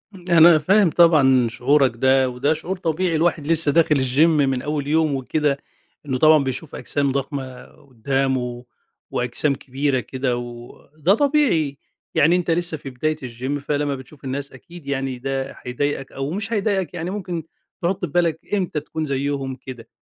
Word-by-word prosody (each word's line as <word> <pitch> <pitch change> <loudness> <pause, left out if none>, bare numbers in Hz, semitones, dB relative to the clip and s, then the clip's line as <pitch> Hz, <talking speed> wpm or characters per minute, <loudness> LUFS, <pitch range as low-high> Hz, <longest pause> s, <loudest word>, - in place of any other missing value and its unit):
أنا 170 -2 +6
فاهم 195 +4 +4
طبعًا 140 -7 +5
شعورك 130 +3 +2
ده 130 +2 +3
وده 130 +5 0
شعور 170 +4 -5
طبيعي، 170 0 -1
الواحد 160 -2 0
لسه 160 -2 +4
داخل 155 0 +3
الجيم 135 +4 +3
من 135 -5 +1
أول 150 -1 -3
يوم 155 -1 +2
وكده 140 +2 0 0.5
إنه 130 -3 -1
طبعًا 155 +1 +5
بيشوف 135 +3 -5
أجسام 140 -1 -1
ضخمة 135 -2 -4
قدامه 130 -1 -3 0.5
وأجسام 125 +4 0
كبيرة 135 +1 -1
كده 130 0 -2
وده 120 +7 -3
طبيعي 235 - +2 0.4
يعني 165 +5 +4
أنت 180 -1 0
لسه 170 -1 -1
في 140 - -8
بداية 155 +5 -1
الجيم 130 +4 -4
فلمّا 145 0 -1
بتشوف 135 +2 -13
الناس 140 +1 -4
أكيد 165 +4 -14
يعني 135 -2 -2
ده 135 +1 -3
هيضايقك 135 +2 -2
أو 135 +2 -4
مش 205 +5 -3
هيضايقك 200 -4 0
يعني 175 0 -4
ممكن 180 -4 -4 0.4
تحط 180 +1 -1
في 160 - -10
بالك 170 -2 +1
إمتى 185 -6 0
تكون 155 +1 -5
زيهم 140 -1 -2
كده. 130 -2 -10
145 Hz, 155 wpm, -21 LUFS, 130-165 Hz, 0.5 s, أنا